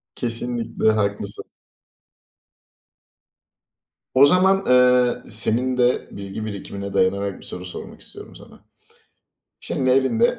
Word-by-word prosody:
Kesinlikle, 120 -1 0
haklısın. 100 -1 -2 2.7
O 135 +2 +7
zaman, 190 +5 +3
ııı, 125 -1 +3
senin 120 +3 +3
de 125 0 +1
bilgi 100 +2 -7
birikimine 100 -1 -7
dayanarak 100 +1 -1
bir - - -14
soru 90 0 -8
sormak 90 - -10
istiyorum - - -12
sana. - - -16 1.0
Şimdi, 130 -1 -2
elinde, 135 - +2
120 Hz, 100 wpm, -21 LUFS, 100-125 Hz, 2.7 s, O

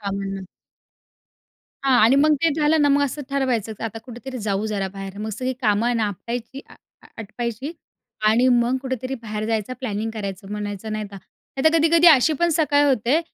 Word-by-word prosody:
कामांना. 195 -1 -4 1.4
हां. 260 -2 +4
आणि 235 +5 +5
मग 300 +2 +5
ते 330 - +4
झालं 300 0 +3
ना, 290 - +4
मग 285 0 +3
असं 285 +2 -4
ठरवायचं 250 -6 0
की - - -9
आता 225 0 -5
कुठेतरी 255 +1 -8
जाऊ 205 -1 -1
जरा 200 -3 -2
बाहेर. 195 0 -8
मग 215 +1 -4
सगळी 255 +5 -3
कामं 220 +3 +2
ना, 220 -2 +1
आपटायची 235 +6 -6
अ, - - -16 0.3
आ - - -16
आटपायची 235 +6 -5 0.6
आणि 240 +4 +4
मग 245 +1 +3
कुठेतरी 260 0 -3
बाहेर 215 -1 -4
जायचा. 225 +1 -1
प्लॅनिंग 220 -2 -3
करायचं 195 -2 -6
म्हणायचं, 210 0 -5
नाहीतर 210 -2 -5
नाही. 265 +7 -10
तर 315 +1 +5
कधी-कधी 330 +2 +4
अशी 305 0 +6
पण 345 - +4
सकाळ 290 -2 +3
होते, 260 +4 +2
235 Hz, 180 wpm, -22 LUFS, 210-270 Hz, 1.4 s, अशी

